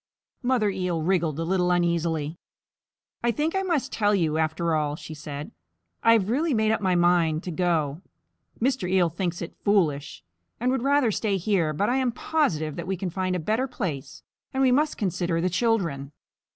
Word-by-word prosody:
Mother 245 -5 +2
Eel 180 -4 -2
wriggled 165 -4 +1
a - - 0
little 180 +1 +1
uneasily. 170 -3 0 0.8
"I 240 - +2
think 300 +8 0
I 385 - +2
must 320 -8 -1
tell 210 -1 +2
you 160 -4 +1
after 160 +1 0
all," 150 -1 0
she 160 -1 -9
said. 150 +3 -7 0.5
"I 230 - +6
have 210 -4 +2
really 295 +2 +1
made 220 0 +2
up 220 - 0
my 185 -2 +2
mind 175 -2 +3
to 180 - -4
go. 160 -3 0 0.6
Mr. 245 -6 0
Eel 185 -2 +3
thinks 175 +1 -3
it 170 - -8
foolish, 150 - +1 0.4
and 250 +2 +1
would 265 - 0
rather 275 -3 +3
stay 205 -1 0
here, 180 -4 +1
but 175 +7 0
I 250 - +2
am 260 -2 +1
positive 175 - -1
that - - -5
we 190 0 -1
can 185 -1 -3
find 185 +1 -1
a - - -1
better 220 +10 0
place, 170 - -5 0.3
and 265 0 +1
we 260 - +5
must 295 +4 +2
consider 175 -4 -1
the 180 +2 0
children. 170 - 0
180 Hz, 190 wpm, -25 LUFS, 160-230 Hz, 0.8 s, I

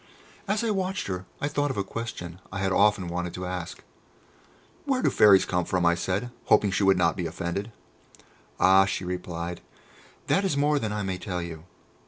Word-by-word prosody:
As 210 +3 0
I 225 - +1
watched 190 -1 -1
her 90 -1 -4
I 145 - -1
thought 145 0 0
of 135 - -4
a 100 - +1
question 90 -6 -6
I 95 - -5
had 95 0 0
often 100 -2 +3
wanted 90 0 -3
to 90 - -5
ask. 90 -1 -5 1.0
"Where 265 -3 0
do - - +3
Fairies 100 -3 +6
come 90 -1 0
from?" 90 0 0
I 85 - +5
said, 95 +7 -2
hoping 100 - +4
she 105 - 0
would 95 -1 +5
not 85 -2 +2
be 90 -3 -2
offended. 90 +6 -4 0.9
"Ah," 95 +1 +6
she 95 -1 -3
replied, 90 -1 -4 0.6
"that 195 - +2
is 185 -8 0
more 145 +1 +2
than 110 -5 -2
I 105 0 -2
may 95 -1 -3
tell 90 -3 -4
you. 80 -1 -8
95 Hz, 195 wpm, -26 LUFS, 90-115 Hz, 1.0 s, Fairies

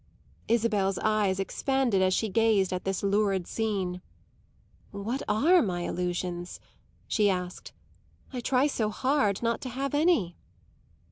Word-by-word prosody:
Isabel's 210 -5 +1
eyes 210 -3 +1
expanded 245 +1 0
as 185 0 +3
she 220 +4 +1
gazed 210 -3 +2
at 180 - -4
this 195 0 -2
lurid 200 -2 +1
scene. 190 -5 -2 0.9
"What 220 +7 -4
are 310 +13 +4
my 180 -4 -2
illusions?" 175 0 -3 0.5
she 210 -3 +2
asked. 180 -1 -4 0.6
"I 250 - -3
try 255 +2 +2
so 230 -7 0
hard 240 -3 0
not 230 0 0
to 255 - -5
have 270 +3 -3
any." 290 - +2
210 Hz, 130 wpm, -28 LUFS, 190-235 Hz, 0.9 s, are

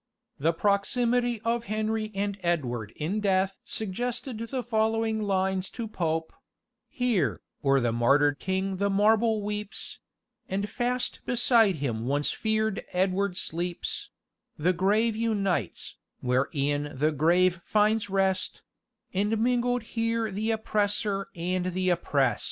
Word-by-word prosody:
The 160 +4 +3
proximity 235 +6 +1
of 235 0 0
Henry 215 +1 -1
and 200 0 -1
Edward 125 - -1
in 175 +8 -2
death 195 -1 +1
suggested 230 +3 -3
the 245 +3 -3
following 220 -1 +1
lines 190 -2 0
to 230 -2 -3
Pope 165 -5 -2 0.6
"Here, 215 - 0 0.2
o'er 135 -1 +4
the 120 -2 +1
martyr 140 +5 +4
king 190 +5 -2
the 200 +1 +1
marble 215 +2 +3
weeps, 210 0 -5 0.5
And 200 +2 -1
fast 245 +3 -1
beside 230 -5 +4
him 120 -6 -2
once 145 +2 +1
fear'd 220 -1 0
Edward 185 +1 +1
sleeps; 175 0 -3 0.5
The 175 +5 +2
grave 210 +5 +2
unites, 200 - -1 0.2
where 125 +2 +1
e'en 145 0 -1
the 150 +3 +2
grave 175 +4 +3
finds 215 0 +2
rest, 190 -1 0 0.5
And 205 +4 +1
mingled 245 +1 +1
here 230 -1 -1
the 215 +3 -2
oppressor 210 -2 0
and 180 +1 -1
the 185 0 +1
opprest." 140 -8 +1
200 Hz, 125 wpm, -27 LUFS, 170-220 Hz, 0.6 s, o'er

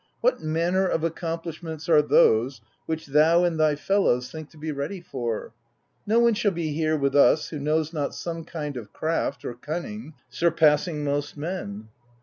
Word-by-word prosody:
What - - +2
manner 170 +4 +1
of 165 - -1
accomplishments 165 -1 -4
are 155 -3 +6
those, 125 -3 +3 0.3
which 160 0 -3
thou 155 +5 +4
and 170 -2 0
thy 155 -1 +3
fellows 145 -8 +1
think 155 -2 -8
to - - -19
be 155 +1 -4
ready 145 +7 -4
for? 120 -9 -4 0.5
No 220 +2 +3
one 235 0 +5
shall 215 -1 +1
be 165 -5 -3
here 155 0 +1
with 140 -1 0
us 145 +2 +5
who 150 - -5
knows 155 +2 0
not 145 -3 -2
some 165 -1 -5
kind 150 -4 -5
of 110 -4 -9
craft 160 +1 -2
or - - -3
cunning 160 - -6
surpassing 155 -1 +2
most 145 +1 -2
men.' 125 - -5
155 Hz, 170 wpm, -25 LUFS, 145-170 Hz, 0.5 s, are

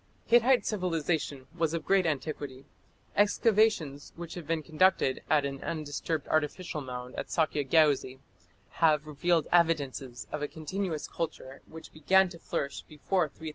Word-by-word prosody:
Hittite 240 +2 +4
civilization 165 -8 -1
was 165 -1 0
of 160 - -4
great 190 -3 +3
antiquity. 145 -2 -4 0.5
Excavations 205 -8 +2
which 170 -1 -7
have 170 -4 -8
been 165 -1 -1
conducted 160 -4 +2
at 150 -2 +3
an 135 -1 -5
undisturbed 155 -1 -3
artificial 155 +1 -1
mound 125 -1 -7
at - - -4
Sakje 150 -4 0
Geuzi 145 -5 +3 0.6
have 155 -2 +4
revealed 155 +2 +1
evidences 140 -7 +1
of 150 - -4
a 145 - -1
continuous 160 +1 -4
culture 155 -5 -5
which 160 0 -12
began 190 +5 +4
to 170 -1 -11
flourish 140 -3 -3
before 160 +3 -1
3000 - - -28
B.C. 160 - -3
155 Hz, 145 wpm, -29 LUFS, 145-175 Hz, 0.6 s, Hittite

